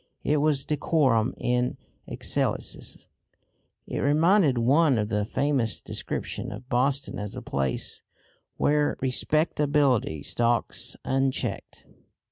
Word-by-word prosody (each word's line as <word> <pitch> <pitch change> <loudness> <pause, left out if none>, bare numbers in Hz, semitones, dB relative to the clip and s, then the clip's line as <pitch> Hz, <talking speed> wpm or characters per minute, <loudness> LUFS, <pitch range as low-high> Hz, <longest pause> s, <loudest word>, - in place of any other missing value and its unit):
It 150 - +2
was 145 -2 +1
decorum 135 -6 +1
in 125 0 0 0.3
excelsis. - - -2 0.8
It - - -4
reminded 155 0 +3
one 135 +3 +4
of 105 -1 -1
the 105 -1 0
famous 125 -4 0
description - - -5
of 125 - -9
Boston 135 +2 0
as 105 -1 -5
the - - -6
place 70 -2 -2 0.6
"where 150 0 +2
respectability 140 - +1
stalks 120 -2 0
unchecked." 135 0 -2
135 Hz, 100 wpm, -26 LUFS, 120-150 Hz, 0.8 s, one